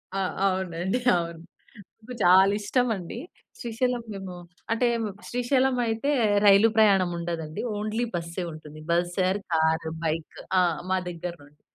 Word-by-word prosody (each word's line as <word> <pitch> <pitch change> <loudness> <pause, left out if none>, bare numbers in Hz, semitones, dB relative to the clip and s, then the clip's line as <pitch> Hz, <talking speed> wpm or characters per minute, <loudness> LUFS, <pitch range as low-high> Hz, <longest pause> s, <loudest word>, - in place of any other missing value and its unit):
ఆ! - - 0 0.3
అవునండి 185 +3 -1 0.2
అవును. 170 -1 -3 0.6
నాకు 250 +3 -9
చాలా 190 +2 +7
ఇష్టమండి. 220 -4 -1 0.4
శ్రీశైలం 240 +1 -1
మేము 190 -2 -7 0.4
అంటే 235 +2 +2
హ్మ్. 225 - -1 0.2
శ్రీశైలం 255 +2 +1
అయితే 225 +5 0 0.3
రైలు 200 +2 +7
ప్రయాణం 195 -4 +5
ఉండదండి. 165 -2 -4 0.2
ఓన్లీ 215 +3 -1
బస్సే 170 +1 -4
ఉంటుంది. 155 -1 -11
Bus 175 +1 +1
or 195 +2 0
car, 160 0 +2 0.2
bike. 160 0 -3 0.2
ఆ! - - +5 0.3
మా 190 - +3
దెగ్గర 175 0 -5
నుండి. 145 +1 -21
190 Hz, 135 wpm, -26 LUFS, 170-225 Hz, 0.6 s, చాలా